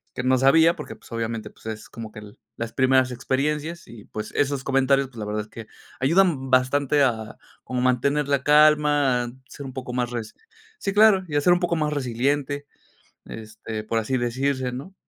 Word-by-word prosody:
que 125 Hz, -, -3 dB
no 130 Hz, 0 st, +3 dB
sabía 160 Hz, +6 st, +5 dB
porque 150 Hz, -, -8 dB
pues -, -, -19 dB
obviamente 115 Hz, -2 st, -4 dB
pues -, -, -23 dB
es 110 Hz, -1 st, -6 dB
como 110 Hz, -2 st, -9 dB
que -, -, -9 dB
el 105 Hz, -1 st, -14 dB, 0.2 s
las 115 Hz, 0 st, -5 dB
primeras 130 Hz, -1 st, +3 dB
experiencias 150 Hz, +6 st, -2 dB
y 115 Hz, -3 st, -12 dB
pues 110 Hz, 0 st, -7 dB
esos 140 Hz, -1 st, 0 dB
comentarios 135 Hz, 0 st, +2 dB
pues 125 Hz, -3 st, -17 dB
la 105 Hz, -, -4 dB
verdad 105 Hz, +1 st, -2 dB
es 105 Hz, -, -10 dB
que 110 Hz, 0 st, -10 dB, 0.3 s
ayudan 145 Hz, -2 st, +2 dB
bastante 140 Hz, +3 st, +3 dB
a, 110 Hz, -4 st, -1 dB, 0.3 s
como 125 Hz, -1 st, -3 dB
mantener 135 Hz, +3 st, +1 dB
la 140 Hz, -1 st, +1 dB
calma, 150 Hz, -4 st, +4 dB
a 120 Hz, -, -6 dB, 0.2 s
ser 140 Hz, -, -9 dB
un 130 Hz, -, -8 dB
poco 130 Hz, -2 st, -6 dB
más 125 Hz, -1 st, -2 dB
resi 115 Hz, -3 st, -5 dB, 0.4 s
sí 195 Hz, -, -3 dB
claro 205 Hz, -3 st, +5 dB
y 150 Hz, -, -5 dB
a 145 Hz, -, +3 dB
ser 175 Hz, -, +4 dB
un 175 Hz, -, +1 dB
poco 175 Hz, -1 st, 0 dB
más 150 Hz, -2 st, 0 dB
resiliente, 140 Hz, +2 st, -1 dB, 0.6 s
este, 110 Hz, 0 st, -7 dB
por 115 Hz, +1 st, -1 dB
así 125 Hz, +4 st, -1 dB
decirse, 130 Hz, +2 st, -1 dB
¿no? 140 Hz, +10 st, -8 dB
130 Hz, 200 wpm, -24 LUFS, 115-145 Hz, 0.6 s, sabía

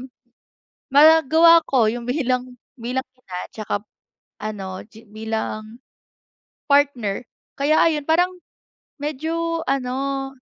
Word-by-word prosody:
m 260 Hz, -, -9 dB, 0.8 s
magagawa 320 Hz, +2 st, +7 dB
ko 250 Hz, -5 st, +3 dB
'yung 235 Hz, +1 st, -6 dB
bilang 255 Hz, -2 st, -1 dB, 0.3 s
bilang 250 Hz, +3 st, -2 dB
ina 220 Hz, -8 st, -10 dB, 0.2 s
tsaka 215 Hz, -1 st, -4 dB, 0.7 s
ano, 195 Hz, -3 st, -5 dB
gi 220 Hz, +1 st, -16 dB
bilang 220 Hz, +1 st, -5 dB, 0.9 s
partner. 265 Hz, -7 st, +2 dB, 0.4 s
Kaya 300 Hz, +3 st, +3 dB
ayon, 300 Hz, -3 st, -1 dB
parang 345 Hz, +3 st, +3 dB, 0.7 s
medyo 325 Hz, +3 st, -2 dB
ano, 270 Hz, +1 st, -2 dB
260 Hz, 100 wpm, -22 LUFS, 225-305 Hz, 0.9 s, magagawa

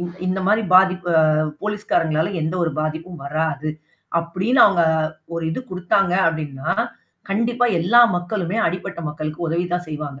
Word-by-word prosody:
இ -, -, -3 dB, 0.2 s
இந்தமாரி 190 Hz, +4 st, +1 dB
பாதிப்பு 185 Hz, -1 st, +4 dB, 0.5 s
போலீஸ்காரங்களால 200 Hz, -6 st, 0 dB
எந்த 160 Hz, +3 st, -2 dB
ஒரு 165 Hz, -, +1 dB
பாதிப்பும் 160 Hz, +2 st, -4 dB
வராது. 155 Hz, 0 st, -2 dB, 0.5 s
அப்பிடின்னு 190 Hz, +10 st, +2 dB
அவுங்க 195 Hz, -4 st, +3 dB, 0.5 s
ஒரு 165 Hz, -1 st, -3 dB
இது 160 Hz, -, -3 dB
கொடுத்தாங்க 185 Hz, +1 st, +1 dB, 0.2 s
அப்டின்னா, 150 Hz, -4 st, -4 dB, 0.6 s
கண்டிப்பா 235 Hz, +4 st, +1 dB
எல்லா 215 Hz, +9 st, +5 dB, 0.2 s
மக்களுமே 180 Hz, +2 st, -3 dB
அடிப்பட்ட 180 Hz, 0 st, -5 dB
மக்களுக்கு 155 Hz, +3 st, -5 dB
உதவிதான் 175 Hz, +2 st, -2 dB
செய்வாங்க. 150 Hz, -2 st, -6 dB
175 Hz, 125 wpm, -21 LUFS, 160-195 Hz, 0.6 s, எல்லா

